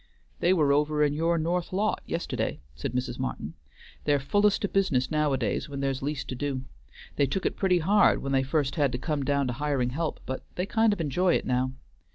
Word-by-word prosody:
"They 175 - +3
were 150 -6 +4
over 150 +1 +2
in 145 -1 +2
your 165 +3 +1
north 170 +2 -1
lot 205 +3 0
yisterday," 165 - -2 0.2
said 65 - -5
Mrs. 125 0 -2
Martin. 80 - -4 0.5
"They're 145 -1 +3
fullest 205 +9 +2
o' - - +1
business 175 -11 +1
nowadays 150 -2 0
when 140 -1 -5
there's 135 -1 -1
least 145 +1 -3
to 130 - -3
do. 135 -1 -2 0.5
They 140 - +3
took 185 +8 -2
it - - 0
pretty 185 -2 +2
hard 195 +5 +4
when 135 - -2
they 135 -1 +3
first 140 +2 -1
had 145 -4 +3
to - - 0
come 150 +1 -2
down 140 0 +1
to 125 - -1
hiring 135 -2 0
help, 160 +4 -2
but 130 - -4
they 180 - -1
kind 220 +2 +3
of 205 -4 -1
enjoy 175 +5 +2
it - - -1
now. 130 +1 0
145 Hz, 210 wpm, -27 LUFS, 135-170 Hz, 0.5 s, were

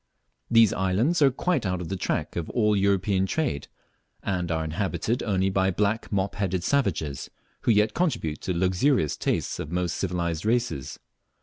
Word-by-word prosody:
These 115 -3 +5
islands 105 - +1
are 140 - +7
quite 145 +2 0
out 90 -2 -1
of 90 - -6
the 95 - -2
track 90 - -2
of 85 -2 -3
all 105 -3 +2
European 95 -1 +2
trade, 135 - -1 0.6
and 90 -3 -1
are 80 0 0
inhabited 90 +7 -1
only 95 -3 +1
by 95 0 +2
black 105 +4 -1
mop 100 -1 0
headed 95 -3 -1
savages, 85 - -1 0.3
who - - +2
yet 105 0 +3
contribute 140 - -1
to 90 - -2
the - - -3
luxurious 95 - +2
tastes - - -1
of - - -5
the 85 - -4
most 90 -1 -1
civilized 85 -3 -2
races. 110 - -1
95 Hz, 175 wpm, -26 LUFS, 90-110 Hz, 0.6 s, are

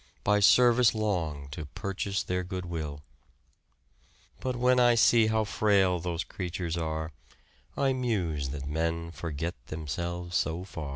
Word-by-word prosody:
By 105 0 +3
service 120 +2 +5
long 85 -10 -2
to 75 +2 -7
purchase 100 - -3
their 90 0 -2
good 90 0 -5
will, 75 -4 -5 1.4
But 130 -1 -2
when 125 +1 +3
I 120 -1 +5
see 115 -1 +5
how 110 0 +2
frail 100 -4 +2
those 85 0 -2
creatures 90 -2 -4
are, 80 -1 -3 0.7
I 135 -1 +2
muse 90 - -1
that 70 0 -5
men 85 +3 -2
forget 80 +1 -4
themselves 85 +3 -4
so 85 +2 0
far. 80 -6 -7
90 Hz, 135 wpm, -29 LUFS, 80-105 Hz, 1.4 s, service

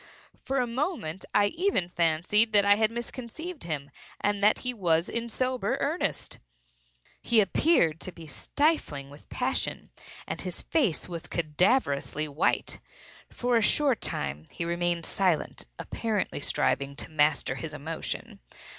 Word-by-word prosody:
For 270 - 0
a 250 - +3
moment 235 - -2
I 205 - +6
even 335 - +1
fancied 175 +7 +2
that 205 -1 +5
I 200 - +7
had 215 +1 +3
misconceived 255 +8 -6
him, 145 -4 -4 0.3
and 205 0 0
that 210 - +4
he 250 - +1
was 170 -6 +1
in 235 0 -3
sober 255 +2 0
earnest. - - -2 0.8
He 235 - +4
appeared 195 - +3
to 185 - -5
be 165 -2 -11
stifling 150 - 0
with 145 - -15
passion, 260 +1 -2 0.3
and - - -4
his 180 -2 -3
face 245 - +1
was 175 -1 -6
cadaverously 155 - +1
white. 150 +4 0 0.5
For 245 -1 +1
a - - +3
short 265 +2 +3
time 70 +2 -2
he 170 - -4
remained 170 0 0
silent, 180 -6 0
apparently 220 -8 -2
striving 140 0 0
to 145 - -4
master 150 -4 +2
his 155 +4 -6
emotion. 155 +2 -5
190 Hz, 140 wpm, -28 LUFS, 155-240 Hz, 0.8 s, I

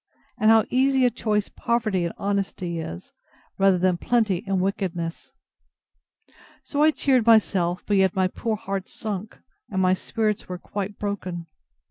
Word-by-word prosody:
And 215 - +4
how 225 -1 +6
easy 265 0 +3
a 245 - +3
choice 210 -2 0
poverty 215 -6 -1
and 170 - -3
honesty 190 -4 -2
is, 85 - -7 0.5
rather 195 -1 +5
than 180 0 +2
plenty 215 -3 +1
and 195 -1 +1
wickedness. 180 -3 -3 1.3
So 285 - -2
I 310 - +7
cheered 260 -6 +2
myself; 185 -6 +3
but 205 - +2
yet 190 -1 +3
my 190 -1 +3
poor 220 +4 -2
heart 195 -2 -4
sunk, 215 -1 -5 0.3
and 190 - -2
my 185 0 +4
spirits 215 +2 -2
were 180 - -4
quite 200 +2 -5
broken. 185 -4 -4
195 Hz, 150 wpm, -24 LUFS, 185-220 Hz, 1.3 s, I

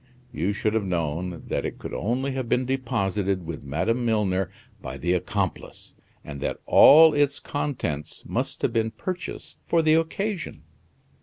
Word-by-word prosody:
You 85 +7 0
should 105 +1 -1
have 110 -1 +1
known 85 -1 -2
that - - -1
it - - -4
could - - -8
only 130 +6 -1
have 130 -3 -4
been 125 +1 +2
deposited 100 -7 -1
with 80 -1 -6
Madame 95 - -1
Milner 100 -5 +1 0.3
by 65 0 -6
the 85 +6 0
accomplice, 90 - -3 0.3
and 70 -2 -7
that - - -2
all 160 +2 +8
its 145 -1 +1
contents 85 - -4
must - - -3
have - - +1
been 115 -1 +1
purchased 180 +9 -6
for 165 -1 +3
the 155 0 +4
occasion." 175 +3 -1
110 Hz, 155 wpm, -25 LUFS, 90-140 Hz, 0.3 s, all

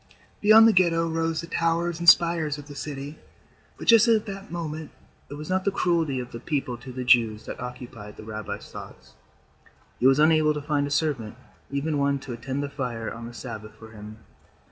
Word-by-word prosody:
Beyond 220 +2 +8
the 225 - +5
Ghetto 165 -3 +3
rose 165 0 -1
the - - -7
towers 165 0 0
and 170 0 +7
spires 165 -4 +4
of 145 -1 -11
the 145 - -9
city, 145 0 -7 0.6
but - - -8
just 230 0 +7
at 225 -2 +3
that 195 -2 -8
moment 160 -2 -5 0.4
it 145 - -7
was 150 +1 -8
not 185 0 0
the - - +2
cruelty 165 -8 0
of 125 -1 -7
the 115 - -7
people 135 -2 -2
to 130 - -10
the 125 0 -5
Jews 115 -3 +3
that - - -7
occupied 125 -4 -8
the - - -10
rabbi's 110 0 -7
thoughts. - - -11 0.9
He 130 - +4
was 135 0 +5
unable 155 0 +4
to 150 - -3
find 145 -1 0
a - - -5
servant, 140 -8 -1 0.3
even 145 +2 -1
one 140 0 +1
to 130 - -7
attend 130 +4 -4
the - - -2
fire 125 -5 -4
on 115 +1 -8
the 120 - -10
Sabbath 110 -4 -8
for 110 0 -13
him. 105 0 -10
145 Hz, 205 wpm, -25 LUFS, 125-165 Hz, 0.9 s, Beyond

